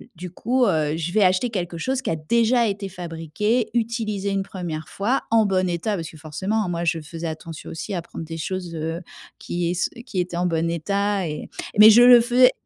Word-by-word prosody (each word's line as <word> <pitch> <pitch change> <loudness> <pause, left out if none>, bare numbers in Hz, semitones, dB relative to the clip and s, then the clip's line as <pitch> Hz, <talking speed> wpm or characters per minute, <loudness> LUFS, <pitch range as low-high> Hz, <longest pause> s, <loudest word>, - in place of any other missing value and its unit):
du 180 +1 -8
coup, 250 +6 +1
heu, 155 -4 +1
je 165 +1 -3
vais 215 - +3
acheter 185 +6 +3
quelque 175 -5 -3
chose 260 +8 -1
qui - - -2
a - - 0
déjà 235 +9 +2
été 200 -1 -3
fabriqué, 175 +7 -2
utilisé 220 -4 -1
une 195 - 0
1re 170 -5 -6
fois, 235 +7 -1
en 225 -1 +5
bon 185 -1 +1
état», 175 +5 -1
parce 165 -4 -5
que 155 - -13
forcément, 185 +8 -2
moi, 170 -1 -2
je 165 0 0
faisais 165 +2 -6
attention 160 0 -7
aussi 165 +5 -5
à 175 - -2
prendre 165 - -8
des 165 +1 -6
choses, 175 +1 -4
heu, 165 +2 -3 0.4
qui 175 0 -2
es 185 +6 -3
qui 210 -7 -4
étaient 175 -1 -2
en 180 - 0
bon 165 -1 0
état 200 +3 -1
et 150 -1 -6 0.3
mais 215 +1 +11
je 240 +3 +7
le 245 -1 +9
faisais 250 +2 +5
185 Hz, 215 wpm, -23 LUFS, 165-215 Hz, 0.4 s, mais